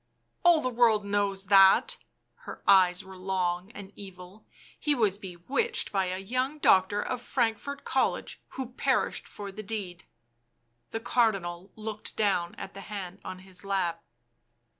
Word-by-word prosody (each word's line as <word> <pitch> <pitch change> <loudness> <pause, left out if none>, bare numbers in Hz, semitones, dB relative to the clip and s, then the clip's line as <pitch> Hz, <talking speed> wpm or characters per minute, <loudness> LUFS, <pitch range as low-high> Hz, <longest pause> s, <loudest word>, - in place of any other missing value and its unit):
" - - -46
All 345 -3 +6
the 255 - +1
world 230 -3 +3
knows 200 -1 0
that 195 0 +6
" - - -48
— - - -48
her - - -8
eyes 185 -1 +5
were 190 -1 -12
long 185 0 -1
and 200 -2 -10
evil; 190 +1 -12 0.2
" - - -25
he 295 -2 +1
was 205 -5 +1
bewitched 235 - -2
by 195 -2 +1
a 185 0 -2
young 255 +9 -2
doctor 205 -6 +4
of 250 -1 -3
Frank 230 -4 0
fort 280 0 -7
College - - -1
who 260 -2 -5
perished 265 0 0
for 200 -1 -8
the 205 +3 -7
deed." 195 -5 -5 0.8
The 225 - -4
Cardinal 195 -7 0
looked 215 -1 -5
down 190 -5 +1
at 195 - -8
the 195 - -8
hand 195 -2 -7
on 185 - -6
his 185 -1 -9
lap. 180 -4 -1
200 Hz, 165 wpm, -28 LUFS, 185-225 Hz, 0.8 s, All